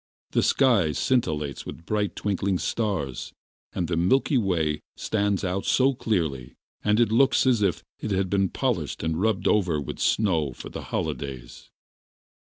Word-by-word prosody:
The - - +2
sky 115 - +3
scintillates 75 - 0
with 85 - -9
bright 105 0 -1
twinkling 100 -2 0
stars, 95 - -2 0.4
and 85 - -2
the 85 - -1
Milky 130 - +2
Way 80 -7 0 0.2
stands 100 -2 0
out 95 +1 -1
so 135 +1 +3
clearly 80 - -2 0.3
that 105 +1 +2
it 115 -3 +3
looks 135 +4 +4
as 125 -4 +3
if 95 -6 0 0.2
it - - -4
had 95 -1 +1
been 95 0 +1
polished - - -2
and 80 +1 -1
rubbed 110 -3 +1
over 90 -7 +2
with 70 - -6
snow 80 - +1
for - - -9
the - - -7
holidays... 65 -5 -5
95 Hz, 155 wpm, -25 LUFS, 80-110 Hz, 0.4 s, looks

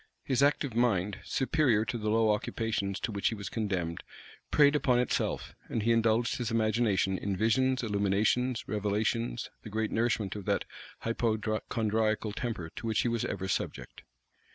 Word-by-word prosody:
His 130 -1 +1
active 140 -2 +2
mind, 105 -5 +1
superior 130 -6 +2
to 115 - -3
the 110 -2 -2
low 110 0 +3
occupations 105 -2 -1
to 115 - -2
which 100 -1 0
he 115 - 0
was 100 -2 -6
condemned, 95 -7 -2 0.5
preyed 145 0 +5
upon 130 -4 +3
itself; 125 -1 -1 0.2
and 110 - -1
he 115 - +3
indulged 115 +1 +2
his 120 -3 -2
imagination 110 -4 +1
in 100 -2 -2
visions, 130 +5 +2
illuminations, 105 +4 +1
revelations; 110 +3 -1
the - - -9
great 110 +1 -1
nourishment 110 -4 0
of 100 -3 -6
that - - 0 0.4
hypochondriacal 110 -1 0
temper 105 -8 -4
to 115 - -4
which 110 - +2
he - - 0
was 115 -1 -1
ever 95 -2 -3
subject. - - -3
110 Hz, 155 wpm, -30 LUFS, 105-120 Hz, 0.5 s, preyed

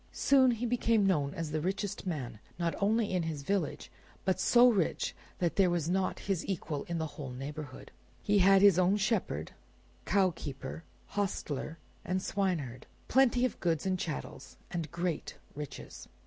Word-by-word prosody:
Soon 265 -2 +4
he 240 0 -1
became 230 -3 +2
known 150 -7 +2
as 165 -2 -4
the 155 0 -1
richest 195 +2 -3
man, 125 - -4 0.2
not 170 -1 0
only 215 +2 +2
in 180 - +2
his 160 -3 -3
own - - -15
village, 195 -5 -1 0.3
but 190 -1 +1
so 240 +5 +6
rich 200 -9 +1 0.2
that 175 -2 -1
there 190 -2 +5
was 170 -3 0
not 185 +2 0
his 195 -4 -1
equal 160 -6 -3
in 170 - -3
the 160 - -1
whole 145 -3 -7
neighborhood. 135 +2 -7 0.3
He 205 0 +3
had 195 +1 +6
his 195 -3 +7
own 185 +3 +4
shepherd, 195 - -1 0.5
cow 190 -1 +3
keeper, 135 +1 -6 0.3
hostler, 165 -6 -3 0.3
and 185 +1 -1
swineherd; 170 -12 -2 0.2
plenty 255 -1 +4
of 255 - -3
goods 165 -2 0
and 185 -1 0
chattels, 155 -4 -6
and 165 -3 -3
great 170 -1 -3 0.2
riches. 145 -1 -8
180 Hz, 165 wpm, -31 LUFS, 155-200 Hz, 0.5 s, his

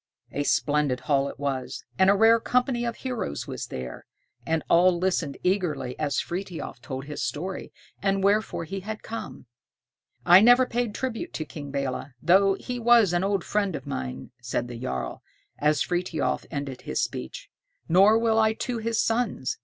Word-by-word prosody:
A 145 - -2
splendid 145 -3 +1
hall 140 -1 +1
it - - -10
was, 135 -2 -3 0.2
and 190 0 +6
a 200 - +6
rare 225 +3 +6
company 245 0 +1
of 235 -1 -2
heroes 245 - -4
was - - -5
there; 65 -1 -7 0.4
and 160 -1 0
all 175 +1 +5
listened 170 -6 -1
eagerly 175 -9 0
as 145 -2 0
Frithiof 175 -8 -5
told 130 +3 -6
his 150 0 -6
story, 185 +5 -4 0.3
and 195 -1 +1
wherefore 205 -3 +1
he 195 +4 -5
had 215 +3 -6
come. 230 - -7 0.8
"I 180 +2 +8
never 245 +3 +7
paid 240 -3 -2
tribute 260 +6 -4
to 155 - -3
King 145 -2 -8
Belé, 140 -1 -3
though 190 +7 +4
he 245 +4 -5
was 230 -5 +5
an 175 +1 +1
old 195 -2 0
friend 200 -4 0
of - - -7
mine," 65 - -5
said 120 0 -2
the 120 -1 -7
jarl, 65 - -4 0.4
as 150 0 +2
Frithiof 175 -2 -1
ended 140 -4 -5
his - - -3
speech, - - -4 0.4
"nor 195 +6 +6
will 225 -1 +2
I 220 0 +4
to 240 +1 -3
his 225 0 -1
sons. 225 - 0
185 Hz, 170 wpm, -26 LUFS, 145-220 Hz, 0.8 s, I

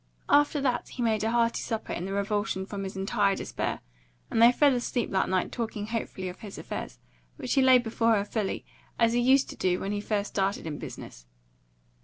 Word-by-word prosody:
After 290 +1 +4
that 255 -3 0
he 245 - -4
made 220 -2 +1
a 220 - +1
hearty 235 0 +1
supper 225 -1 -3
in 175 - -4
the 195 - -4
revulsion 200 0 -1
from 200 0 -5
his 190 0 -6
entire 200 0 +1
despair; - - -3 0.5
and 225 - +2
they 235 +1 +9
fell 285 +2 +4
asleep 245 -1 -1
that 190 - +1
night 185 -1 0
talking 220 -3 -3
hopefully 215 -4 -4
of 180 0 -7
his 205 -3 -9
affairs, - - -6 0.4
which 255 -5 -2
he 275 - +4
laid 260 -2 +6
before 225 0 +2
her 200 -1 0
fully, 210 -2 -3 0.3
as 230 -1 +3
he 240 - +2
used 265 +3 +4
to - - -9
do 180 -1 0
when 195 - -3
he 205 0 -2
first 205 -1 -1
started 195 -1 -1
in 150 -2 -5
business. - - -9
220 Hz, 210 wpm, -28 LUFS, 195-240 Hz, 0.5 s, they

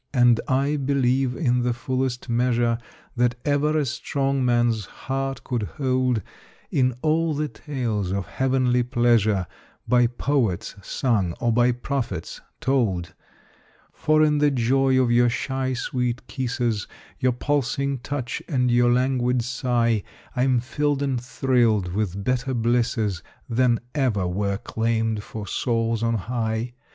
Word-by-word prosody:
And 120 -2 +5
I 140 +3 +1
believe, 135 -2 +1
in 125 -5 +1
the 120 0 +1
fullest 130 0 -2
measure 120 -1 +1 0.4
That 120 0 +2
ever 150 +1 +2
a 150 - +1
strong 135 0 -1
man's 120 -3 +2
heart 135 0 -4
could 120 -3 -2 0.2
hold, 130 - +1 0.5
In 125 -2 +2
all 160 0 +2
the 150 +1 -1
tales 120 -11 -3
of 100 -1 -2
heavenly 130 0 +1
pleasure 120 -6 +2 0.4
By 120 -1 +4
poets 120 -5 -1
sung 100 -6 0
or 120 -1 +1
by 120 +1 +4
prophets 125 - -4 0.2
told; 95 -11 0 0.8
For 155 0 +3
in 150 -1 +3
the 145 0 +4
joy 130 +1 +2
of 125 -2 +2
your 120 0 +4
shy, 130 +2 -2
sweet 125 0 -2
kisses, 120 -5 -2 0.3
Your 130 - +3
pulsing 140 0 -1
touch 130 0 -4
and 125 -5 +2
your 120 0 +4
languid 125 -1 +1
sigh 120 -3 +1 0.3
I 125 - 0
am 130 -2 +3
filled 145 +2 -1
and 130 -4 -1
thrilled 120 -7 +1
with 100 -1 -2
better 125 +3 0
blisses 115 -5 0 0.3
Than 120 0 +2
ever 125 -10 +1
were 100 +2 -1
claimed 115 0 -1
for 105 0 -7
souls 115 +2 0
on 115 0 +1
high. 115 +2 -2
125 Hz, 135 wpm, -24 LUFS, 115-135 Hz, 0.8 s, And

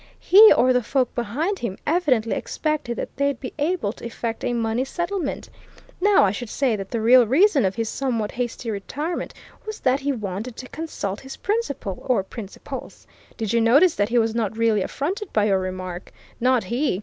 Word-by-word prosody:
He 425 +4 +8
or 255 +1 +4
the 250 - +2
folk 255 +2 0
behind 285 - -2
him 205 -5 -4
evidently 285 -9 +1
expected 300 -6 -2
that - - -5
they'd 280 -2 0
be 255 - -7
able 300 - 0
to - - -16
effect 230 -1 -4
a - - 0
money 230 +1 0
settlement. 345 +6 -3 0.5
Now, 410 +1 +5
I 195 - +3
should 220 +3 -6
say 260 -3 +1
that 195 -2 -6
the 230 - -2
real 240 +2 +6
reason 295 - +4
of 190 - 0
his 225 0 -2
somewhat 230 -4 -2
hasty 240 -1 -3
retirement 290 - -4 0.3
was 430 -1 -7
that 260 +1 +2
he 280 +1 -1
wanted 215 0 -5
to 255 - -7
consult 250 -11 -4
his 265 0 -9
principal 370 - -2
or 245 -7 +2
principals. 200 0 -9 0.3
Did 220 -2 -2
you 235 - +3
notice 285 +10 +5
that 205 +1 0
he 240 - +1
was 225 -1 +2
not 225 -2 -2
really 225 -3 +2
affronted 360 - -3
by 210 -1 +3
your 195 -2 +2
remark? 185 -1 -5 0.3
Not 250 -1 +3
he! 245 -5 -1
245 Hz, 190 wpm, -23 LUFS, 220-285 Hz, 0.5 s, He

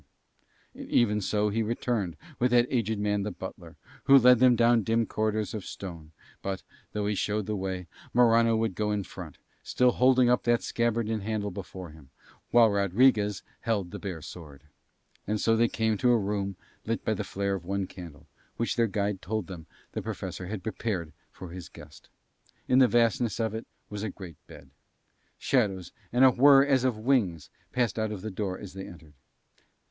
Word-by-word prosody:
And - - -10
even 105 -3 +2
so 105 +2 0
he 110 +2 0
returned 110 -5 -2 0.2
with 125 - +3
that 120 0 +4
aged 110 -3 0
man 105 0 0
the 105 - -2
butler, 95 - -9 0.3
who 140 - +8
led 125 -2 +6
them 125 -1 +6
down 115 0 +4
dim 115 +2 +1
corridors 110 -1 -1
of 105 -3 -5
stone; 85 -5 -8 0.3
but, 95 -1 -4 0.3
though 105 -1 -2
he 105 - 0
showed 105 +1 -1
the 105 - -2
way, 95 -2 -4 0.3
Morano 115 -1 +4
would 110 -3 0
go 105 +2 -1
in 105 -1 -1
front, - - -10 0.2
still 125 0 +2
holding 125 0 +4
up 125 0 +3
that 120 0 +1
scabbard 115 -1 0
and 110 -1 -2
handle 105 0 -2
before 90 -2 -8
him, 75 -4 -16 0.4
while 115 -2 +5
Rodriguez 100 +1 +2 0.2
held 100 -6 -2
the - - -6
bare 90 -6 -6
sword. 75 -5 -11 0.6
And 105 +1 -1
so 115 +2 +3
they 115 +1 +3
came 110 -2 -1
to 125 - +3
a 120 - +5
room 100 -2 -2 0.3
lit - - -3
by - - +1
the - - -3
flare 100 0 -2
of 95 -3 -4
one 100 +2 -2
candle, 85 -6 -11 0.3
which 115 - -1
their 115 -1 +3
guide 100 -1 -2
told 110 0 -3
them 85 -4 -9 0.2
the - - -4
Professor 90 - -6
had 100 -1 -5
prepared 95 -7 -3 0.2
for 95 - -10
his 90 -1 -8
guest. 75 -1 -14 0.6
In 130 - +4
the 130 - +7
vastness 115 -3 +1
of 110 -2 -1
it 110 +1 -6 0.2
was 105 -1 -6
a 110 - -2
great 90 -6 -10
bed. - - -14 0.7
Shadows 100 -9 0 0.2
and 125 +2 +5
a 130 - +7
whir 135 +2 +6
as 135 -3 +2
of 125 -4 +1
wings 100 - 0 0.2
passed 120 -4 0
out 110 -1 -1
of 100 -3 -6
the 110 - -4
door 95 -1 -3
as 95 -3 -10
they 95 0 -7
entered. 80 -3 -14
105 Hz, 190 wpm, -28 LUFS, 95-115 Hz, 0.7 s, who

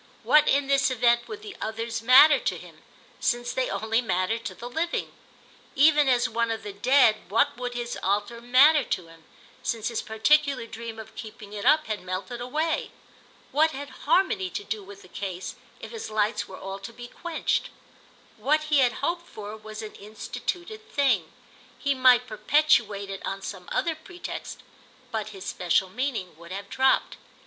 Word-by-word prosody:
What 300 0 +5
in 280 0 +3
this 275 -1 +3
event 240 -1 +2
would 430 -1 -8
the 415 -2 -8
Others 230 +1 -3
matter 265 +5 +8
to - - -2
him, - - -14 0.4
since 240 0 0
they 260 -1 0
only 225 +2 0
mattered 220 +1 -1
to - - -5
the 240 - -8
living? 325 +7 -2 0.6
Even 295 0 +5
as 245 -1 +3
one 230 +1 0
of 225 -2 -3
the 205 -1 -6
Dead 240 +1 +4
what 225 +4 +2
would 245 0 -5
his 240 0 -4
altar 205 +4 -1
matter 270 +5 +6
to 180 -7 -3
him, 165 -1 -17 0.4
since 225 -1 -2
his 230 - -2
particular 275 +4 +2
dream 230 0 -7
of 220 0 -10
keeping 215 -2 -10
it 205 -1 -5
up 310 0 +5
had 215 -1 -3
melted 185 +6 -5
away? 310 +6 -1 0.6
What 315 +2 +3
had 285 +1 -6 0.2
harmony 290 - +3
to 205 - -5
do 210 +1 -4
with 200 +1 -12
the - - -14
case 185 -1 -5 0.3
if - - -9
his 455 - -6
lights 215 +1 0
were 190 - -10
all 195 0 -6
to 195 +3 -8
be 240 +1 -10
quenched? 340 +5 -2 0.7
What 305 +2 +2
he 290 - +6
had 255 +2 +2
hoped 345 +1 -2
for 210 0 -8
was 215 0 -8
an 215 - -8
instituted 350 - -6
thing. 225 - +1 0.5
He 280 0 +1
might 255 -2 +5
perpetuate 215 -4 +2
it 195 - -7
on 195 0 -4
some 185 -3 -7
other 335 - +1
pretext, 350 +3 -8 0.5
but 215 -1 -3
his 195 -2 -10
special 180 +1 +1
meaning 235 - -3
would 170 +1 -13
have 200 +1 -6
dropped. 265 0 +2
235 Hz, 175 wpm, -26 LUFS, 205-280 Hz, 0.7 s, matter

